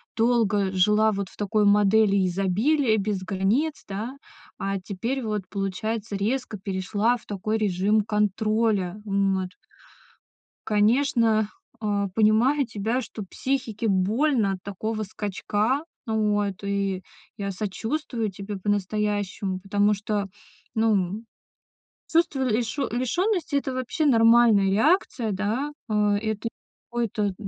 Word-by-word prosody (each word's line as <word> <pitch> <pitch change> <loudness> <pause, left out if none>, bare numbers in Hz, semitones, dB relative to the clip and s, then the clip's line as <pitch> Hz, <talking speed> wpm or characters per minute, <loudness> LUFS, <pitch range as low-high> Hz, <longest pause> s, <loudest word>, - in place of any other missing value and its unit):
долго 220 -4 +2
жила 210 +3 +3
вот 200 -2 -3
в - - -19
такой 210 0 +1
модели 205 -1 +4
изобилия 215 - +2
и - - +1
без 200 -2 -1
границ, 210 +11 0
да, 220 +7 -5 0.4
а 195 0 -2
теперь 230 +8 -3
вот, 210 -2 -1
получается, 205 +2 -3
резко 220 +2 -2
перешла 200 +5 0
в - - -21
такой 215 +2 -2
режим 205 +1 +2
контроля. 210 -1 0
М, 195 -1 +1
вот. 185 - -4 1.2
Конечно, 220 0 +3 0.3
а, 205 -2 0
понимаю 225 +8 +3
тебя, 225 +3 -1
что 220 -2 -7
психике 235 0 -2
больно 215 +3 +2
от 185 - -6
такого 215 +2 -3
скачка. 210 - -1 0.2
Вот, 205 -3 0
и 200 -2 -1 0.3
я 200 -1 -3
сочувствую 220 +4 -3
тебе 200 +1 -6
по-настоящему. 205 -1 -1
Потому 205 +2 +2
что, 205 -1 -2 0.5
ну, 220 0 +3
м, 200 +3 -1 0.9
чувство 330 -4 +2
лишё 240 +4 -1
лишённости- 325 - 0
это 275 -1 0
вообще 255 +6 -1
нормальная 230 -5 +5
реакция, 235 - +2
да. 215 +9 -1 0.2
Э, - - -1 0.2
это 220 +1 -3 0.4
какой-то 215 -4 -1
210 Hz, 120 wpm, -25 LUFS, 200-230 Hz, 1.2 s, нормальная